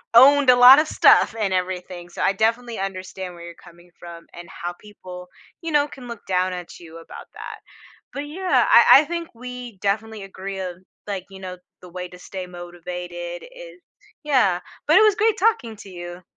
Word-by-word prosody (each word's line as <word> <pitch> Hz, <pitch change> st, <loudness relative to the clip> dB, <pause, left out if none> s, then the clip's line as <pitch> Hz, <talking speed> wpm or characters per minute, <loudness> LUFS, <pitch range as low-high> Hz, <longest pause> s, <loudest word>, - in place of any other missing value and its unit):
owned 275 Hz, +2 st, +7 dB
a 250 Hz, -, +8 dB
lotta 265 Hz, +5 st, +8 dB
stuff -, -, +4 dB
and 200 Hz, -3 st, -1 dB
everything, 180 Hz, -1 st, -4 dB
so, -, -, -5 dB
I 195 Hz, -, +3 dB
definitely 230 Hz, +2 st, -1 dB
understand 185 Hz, -1 st, -6 dB
where 170 Hz, -, -12 dB
you're 170 Hz, -, -9 dB
coming 175 Hz, 0 st, -18 dB
from, 170 Hz, -1 st, -11 dB
and 175 Hz, 0 st, -11 dB
how 175 Hz, +1 st, -6 dB
people, 180 Hz, -4 st, -12 dB, 0.3 s
you 330 Hz, -2 st, -5 dB
know, 295 Hz, 0 st, +3 dB
can 255 Hz, -4 st, -12 dB
look 235 Hz, -3 st, -9 dB
down 185 Hz, 0 st, 0 dB
at 180 Hz, -1 st, -9 dB
you 165 Hz, -1 st, -12 dB
about 165 Hz, -, -12 dB
that, -, -, -9 dB, 0.5 s
but, 285 Hz, +1 st, -5 dB
yeah, 365 Hz, +5 st, +1 dB
I -, -, +7 dB, 0.2 s
I -, -, -6 dB
think 340 Hz, 0 st, -4 dB
we 250 Hz, -3 st, -9 dB
definitely 215 Hz, +2 st, -2 dB
agree 195 Hz, 0 st, -7 dB
of, 180 Hz, -2 st, -5 dB, 0.3 s
like, 195 Hz, -3 st, -4 dB
you 190 Hz, -, -11 dB
know, 185 Hz, -1 st, -7 dB, 0.2 s
the 180 Hz, -, -13 dB
way 180 Hz, +1 st, -7 dB
to 180 Hz, 0 st, -14 dB
stay 185 Hz, 0 st, -8 dB
motivated 175 Hz, 0 st, -8 dB
is -, -, -13 dB, 0.4 s
Yeah, 250 Hz, -12 st, +2 dB, 0.3 s
but, -, -, +6 dB
it -, -, +5 dB
was 430 Hz, -2 st, +5 dB
great 435 Hz, -1 st, +1 dB
talking 360 Hz, -, +1 dB
to 200 Hz, -, -13 dB
you. 175 Hz, 0 st, -9 dB
190 Hz, 190 wpm, -22 LUFS, 180-250 Hz, 0.5 s, a